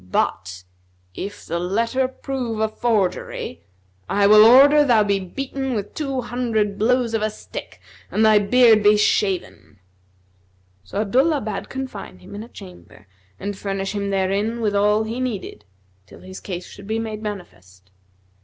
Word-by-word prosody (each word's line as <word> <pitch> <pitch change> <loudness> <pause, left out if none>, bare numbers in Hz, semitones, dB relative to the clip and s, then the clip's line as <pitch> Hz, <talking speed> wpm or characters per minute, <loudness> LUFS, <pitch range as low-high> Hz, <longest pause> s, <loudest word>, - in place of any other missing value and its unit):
But, 90 +1 -1 0.5
if 200 - -7
the 170 +1 -3
letter 230 +8 0
prove 255 -4 -5
a 220 - +2
forgery, 210 - -2 0.5
I 200 0 +2
will 210 +1 +8
order 280 +6 +7
thou 235 -6 +4
be 200 -1 +1
beaten 265 +7 -4
with 205 -2 -4
two 275 -4 -3
hundred 225 -4 -1
blows 240 +1 +1
of 225 - 0
a 215 - +1
stick 215 - -9 0.3
and 220 - +2
thy 215 -1 +6
beard 220 +1 +5
be 210 +1 +5
shaven." 190 - -1 1.1
So 195 - -3
Abdullah 270 +8 +2
bade 210 -2 -5
confine 260 - -7
him 90 - -14
in 205 - -6
a 230 - -10
chamber 185 - -14 0.3
and 205 +1 -4
furnish 195 0 -3
him 200 -1 -2
therein 200 +4 0
with 210 -3 0
all 210 +2 +3
he 225 +3 -5
needed, 205 - -5 0.4
till - - -15
his 185 0 -10
case 180 -2 -6
should 200 0 -13
be 220 +1 -1
made 220 -1 -4
manifest. 95 - -9
210 Hz, 155 wpm, -21 LUFS, 195-235 Hz, 1.1 s, will